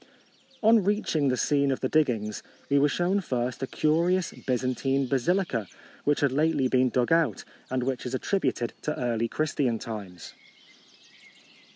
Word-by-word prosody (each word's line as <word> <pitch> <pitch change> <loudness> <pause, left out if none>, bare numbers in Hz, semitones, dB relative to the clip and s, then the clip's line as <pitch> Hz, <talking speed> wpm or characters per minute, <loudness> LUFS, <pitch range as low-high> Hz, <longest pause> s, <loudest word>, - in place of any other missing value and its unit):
On 220 -1 +5
reaching 185 -7 +1
the 125 -1 +1
scene 140 0 +2
of 130 - -2
the 130 - +1
dig 155 +2 +3
gings, 105 -6 -3 0.3
we 140 - +5
were 145 +1 +4
shown 180 +6 +1
first 125 -6 -3
a 135 - -2
curious 170 +5 +1
Byzantine 130 +2 -1
basilica, 135 - 0 0.4
which 145 0 +2
had 140 -2 +3
lately 150 -1 +2
been 130 0 +3
dug 125 +2 0
out, 165 - +2 0.3
and 130 -1 -1
which 130 -1 -2
is 125 - -3
attrib 195 +9 0
uted 120 - -4
to 150 - -3
early 115 -2 0
Christian 140 -3 -1
times. 100 -7 -8
135 Hz, 160 wpm, -27 LUFS, 125-155 Hz, 0.4 s, On